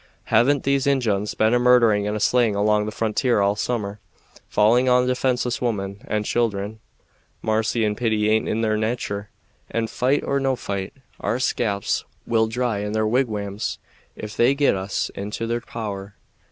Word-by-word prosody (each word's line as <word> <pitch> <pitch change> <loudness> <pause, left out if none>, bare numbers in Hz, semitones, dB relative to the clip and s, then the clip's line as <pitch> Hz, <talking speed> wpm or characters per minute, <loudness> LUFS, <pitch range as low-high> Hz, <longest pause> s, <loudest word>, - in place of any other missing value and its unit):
Haven't 130 +5 +4
these 140 0 +1
Injuns 110 -7 +1
been 110 +2 +3
a 125 - +4
murdering 120 -4 +4
and 105 +1 -1
a - - -4
slaying 120 -2 +2
along 105 +1 +2
the - - -3
frontier 115 +2 +1
all 100 0 +3
the 105 - -9
summer, 105 -4 -2 0.5
falling 120 +5 +4
on 125 0 +4
defenseless 125 -1 0
women 100 -3 -2
and 105 -4 -1
children? 110 -2 -1 0.6
Marcy 110 +1 +1
and 105 0 0
pity 110 -2 +1
aint 110 +1 +2
in 110 - 0
their 110 -1 +1
natur, 105 -2 -2 0.4
and, 115 -1 -2
fight 130 +3 +1
or 140 - 0
no 135 -1 +1
fight, 100 -5 -4 0.3
our 115 - -1
scalps 105 -6 0 0.2
will 110 -1 +2
dry 115 -2 -1
in 105 +1 -3
their 110 0 +1
wigwams 110 -4 -1 0.4
if 105 0 -7
they 125 +4 +3
get 140 -5 +3
us 95 +1 -2
into 105 +3 -4
their 120 +1 -2
power. 100 -4 -6
110 Hz, 170 wpm, -23 LUFS, 105-125 Hz, 0.6 s, Haven't